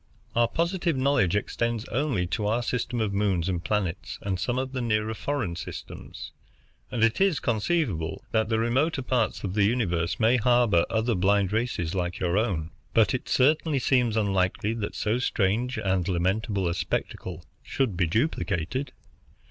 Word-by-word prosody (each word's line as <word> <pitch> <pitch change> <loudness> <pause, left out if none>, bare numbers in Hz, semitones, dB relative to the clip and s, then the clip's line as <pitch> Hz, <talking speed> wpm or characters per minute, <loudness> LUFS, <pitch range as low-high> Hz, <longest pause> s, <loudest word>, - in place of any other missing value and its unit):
Our 120 0 +4
positive 170 +3 0
knowledge 130 -9 +2
extends 115 +2 -1
only 130 -9 0
to 105 +4 -2
our 115 +3 +1
system 120 0 -2
of 105 -3 0
moons 100 -4 +1
and 90 -2 -2
planets 85 - -2
and 95 -2 -2
some 120 +6 -1
of 130 0 -2
the 130 -1 -3
nearer 110 -1 0
foreign 110 -6 -2
systems, - - -8 0.6
and 120 -3 -1
it 115 +9 +2
is 195 -6 +3
conceivable 110 - -1
that 110 -1 +1
the 110 - +2
remoter 130 +6 +1
parts 125 -3 0
of 95 -2 -3
the 105 0 +3
universe 90 -7 0
may 115 +3 +4
harbor 120 -7 +3
other 115 +2 +1
blind 100 +1 +2
races 110 -8 -1
like 90 -1 -2
your 90 -1 0
own; 95 -7 0 0.2
but 115 -2 +4
it 130 - -3
certainly 150 +3 +3
seems 125 -3 +2
unlikely 100 +1 +1
that 110 -3 -4
so 110 +3 0
strange 115 +2 0
and 95 -4 0
lamentable 95 +2 0
a 85 - 0
spectacle 85 -1 -4 0.2
should 125 -8 -1
be 85 -1 +1
duplicated. 105 - -1
110 Hz, 165 wpm, -26 LUFS, 95-125 Hz, 0.6 s, Our